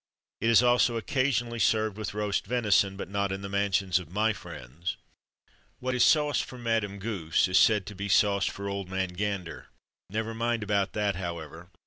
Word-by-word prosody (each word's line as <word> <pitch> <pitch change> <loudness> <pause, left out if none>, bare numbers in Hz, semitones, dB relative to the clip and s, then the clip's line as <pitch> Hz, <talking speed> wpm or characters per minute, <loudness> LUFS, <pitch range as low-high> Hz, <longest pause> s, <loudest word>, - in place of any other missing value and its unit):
It 115 - +1
is 115 +1 +6
also 120 -1 +3
occasionally 120 0 0
served 110 +1 +2
with 105 -2 -5
roast 105 -2 -1
venison; 105 -5 +2
but - - -5
not 100 0 -1
in 95 +1 -4
the 100 - -5
mansions 95 -2 +1
of 90 -4 -10
my 110 +5 +1
friends. 85 - -7 0.8
What 130 0 -3
is 125 - +3
sauce 150 -2 +3
for 125 - -9
Madame 115 -4 -1
Goose 95 -7 0
is 90 0 +4
said 105 -2 +4
to 105 - -8
be 100 +1 -5
sauce 100 -1 +3
for 100 0 -5
Old 100 -2 -4
Man 95 -1 -1
Gander. 95 -1 -4 0.4
Never 110 +3 -3
mind 115 0 -1
about 100 -2 0
that, 105 -3 0
however. 85 -1 -6
100 Hz, 180 wpm, -28 LUFS, 95-115 Hz, 0.8 s, is